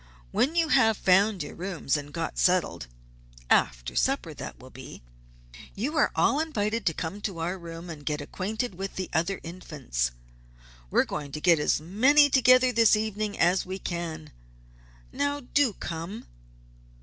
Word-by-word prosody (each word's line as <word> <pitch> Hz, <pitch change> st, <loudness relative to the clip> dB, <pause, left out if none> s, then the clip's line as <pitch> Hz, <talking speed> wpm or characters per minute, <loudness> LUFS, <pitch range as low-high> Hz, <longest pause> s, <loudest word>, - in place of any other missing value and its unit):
"When 295 Hz, -, +1 dB
you 330 Hz, -2 st, +2 dB
have 225 Hz, -7 st, +4 dB
found 195 Hz, -1 st, +3 dB
your 145 Hz, -, -8 dB
rooms 175 Hz, -6 st, -2 dB
and 145 Hz, -1 st, -5 dB
got 165 Hz, +1 st, -4 dB
settled 180 Hz, -, +1 dB, 0.6 s
after -, -, +2 dB
supper, -, -, 0 dB
that -, -, -8 dB
will -, -, -14 dB
be, -, -, -11 dB, 0.7 s
you 265 Hz, +10 st, -3 dB
are 305 Hz, -, +3 dB
all 280 Hz, -, +3 dB
invited 230 Hz, -9 st, -1 dB
to 165 Hz, -, +2 dB
come 185 Hz, +5 st, -5 dB
to 195 Hz, -4 st, -4 dB
our 170 Hz, +3 st, -2 dB
room 170 Hz, 0 st, -9 dB
and 155 Hz, -4 st, -8 dB
get 150 Hz, 0 st, -2 dB
acquainted 205 Hz, +9 st, -4 dB
with 195 Hz, +2 st, -6 dB
the 185 Hz, -, -5 dB
other 175 Hz, +4 st, 0 dB
Infants. 145 Hz, -, -3 dB, 0.8 s
We're -, -, +3 dB
going 145 Hz, -2 st, -5 dB
to 150 Hz, -, -4 dB
get 170 Hz, 0 st, +4 dB
as 150 Hz, -, +1 dB
many 260 Hz, -, +4 dB
together 255 Hz, -1 st, +5 dB
this 230 Hz, -2 st, +5 dB
evening 215 Hz, -1 st, -2 dB
as 180 Hz, +3 st, +3 dB
we 185 Hz, +1 st, -5 dB
can. 165 Hz, -4 st, -5 dB, 0.8 s
Now, 285 Hz, +1 st, -1 dB
do 255 Hz, -2 st, +1 dB
come!" 170 Hz, +6 st, -6 dB
190 Hz, 160 wpm, -27 LUFS, 165-230 Hz, 0.8 s, together